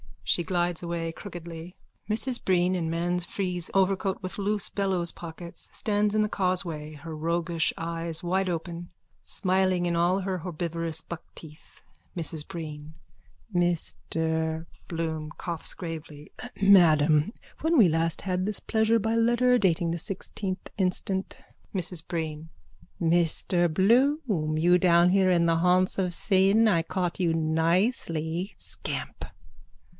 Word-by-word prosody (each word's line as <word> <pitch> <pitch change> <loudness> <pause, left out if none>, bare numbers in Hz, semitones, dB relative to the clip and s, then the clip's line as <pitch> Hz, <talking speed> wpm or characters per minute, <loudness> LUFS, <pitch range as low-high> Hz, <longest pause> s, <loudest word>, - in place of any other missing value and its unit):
_(She 175 - +2
glides 175 -1 0
away 170 -1 -3
crookedly. 170 -1 -9 0.3
Mrs 240 +3 +1
Breen 180 -1 +2
in 170 -3 -1
man's 175 +2 -1
frieze 180 -3 -2
overcoat 195 0 +1
with 185 - -5
loose 205 0 +2
bellows 190 -4 +2
pockets, 170 0 -8
stands 210 0 +1
in 215 - +3
the 210 - +1
causeway, 175 -6 -1
her 155 +2 -8
roguish 165 +1 0
eyes 165 -1 -3
wideopen, 175 -1 -2 0.3
smiling 185 -2 +1
in 170 -1 0
all 180 +3 +2
her 190 -1 -2
herbivorous 165 -1 -3
buckteeth.)_ 160 -2 -12 0.4
MRS 160 -2 -1
BREEN: 155 -2 -7 0.6
Mr... 160 -2 -1 0.2
BLOOM: 160 -2 -3
(Coughs 170 -2 -2
gravely.) 160 -4 -8 0.3
Madam, 165 -3 +5 0.3
when 320 +1 +2
we 220 -8 +7
last 165 +1 0
had 185 -1 -1
this 210 0 -4
pleasure 220 +1 +2
by 225 +2 -1
letter 240 +2 +3
dated 170 -4 +1
the 170 - -2
sixteenth 190 +1 -4
instant... 190 0 -1 0.4
MRS 180 -2 -1
BREEN: 160 -2 -4 0.5
Mr 170 +1 +2
Bloom! 215 - +2
You 175 +3 +4
down 175 -1 +5
here 190 0 +3
in 170 -2 +3
the 165 -1 +3
haunts 180 +3 +2
of 180 -2 0
sin! 195 +5 +3
I 170 -6 +3
caught 180 +1 -3
you 170 -3 +2
nicely! 165 +1 0
Scamp! - - -6
175 Hz, 130 wpm, -27 LUFS, 165-190 Hz, 0.6 s, we